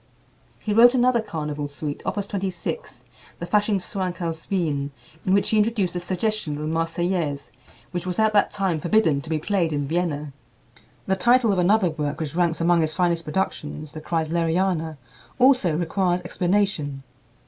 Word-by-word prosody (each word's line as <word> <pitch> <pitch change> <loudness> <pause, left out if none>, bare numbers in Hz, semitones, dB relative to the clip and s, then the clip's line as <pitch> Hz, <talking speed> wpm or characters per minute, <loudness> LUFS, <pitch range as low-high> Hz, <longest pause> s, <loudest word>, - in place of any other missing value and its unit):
He 210 - -3
wrote 240 +3 +7
another 245 -1 +3
carnival 150 -7 -4
suite, 145 0 -5
Opus 205 -1 -1
26, 190 -3 -4 0.3
the 170 - -5
"Faschingschwank 195 -2 0
aus 165 -2 -4
Wien," 150 -7 0 0.4
in - - +3
which 200 - +1
he 220 - +3
introduced 210 -5 +1
a - - 0
suggestion 185 -2 -2
of 150 - -5
the - - -2
"Marseillaise," 165 -2 -1 0.4
which 180 0 -4
was 180 - -2
at 220 -1 +3
that 205 - +4
time 190 -5 -1
forbidden 165 -4 +2
to 160 - -10
be 160 - +1
played 170 0 0
in 145 -2 -1
Vienna. 150 -3 -2 0.7
The 190 - +1
title 240 +3 +4
of 185 - 0
another 185 0 +3
work 150 -2 -3
which 155 -3 -4
ranks 170 -2 +1
among 170 0 +3
his 155 -1 -1
finest 170 -2 +1
productions, 150 -3 -3
the 155 - -7
"Kreisleriana," 165 0 0 0.4
also 250 - +4
requires 180 +1 0
explanation. 175 -6 -1
175 Hz, 160 wpm, -24 LUFS, 155-195 Hz, 0.7 s, wrote